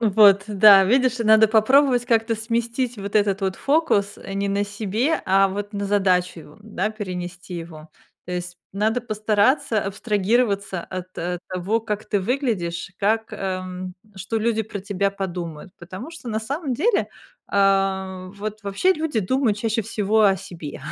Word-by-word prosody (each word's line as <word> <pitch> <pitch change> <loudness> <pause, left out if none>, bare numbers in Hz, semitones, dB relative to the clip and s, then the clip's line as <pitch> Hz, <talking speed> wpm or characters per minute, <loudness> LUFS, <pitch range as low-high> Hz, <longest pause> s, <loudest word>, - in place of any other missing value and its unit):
Вот, 200 -3 +5
да, 200 -1 +7
видишь, 255 +4 +2
надо 220 -1 +5
попробовать 245 +3 +4
как-то 230 -1 +1
сместить 235 +1 -2
вот 200 +1 -6
этот 200 -1 +2
вот 190 -1 -1
фокус, 275 -10 +1
э, 195 - -8
не 200 0 -1
на 200 +1 0
себе, 215 +8 -1
а 195 +1 +4
вот 205 +2 -5
на 200 -1 -3
задачу 185 -4 +1
его, 150 +2 -16
да, 210 -1 -3
перенести 180 -4 -6
его. 165 -2 -8 0.4
То 180 - -5
есть 175 0 -5 0.2
надо 220 +4 +1
постараться 215 +1 +1
абстрагироваться 200 -2 0
от, 185 0 -8
э, 175 +1 -3
того, 185 +5 -1
как 210 -2 -4
ты 205 - 0
выглядишь, 190 -8 -2
как, 220 +2 0
эм 185 -2 -5 0.2
что 195 +4 -4
люди 225 0 +1
про 205 -1 -7
тебя 200 0 -1
подумают, 175 -4 -6
потому 185 - -9
что 325 -7 -9
на 220 -1 -2
самом 275 +4 -3
деле, 400 - +1 0.4
а, 195 -1 +1
вот 215 +1 -6
вообще 200 - +2
люди 310 -9 -2
думают 230 +2 +1
чаще 225 0 -1
всего 215 0 +1
о 195 -1 +4
себе. 170 -6 -9
205 Hz, 160 wpm, -22 LUFS, 190-225 Hz, 0.4 s, да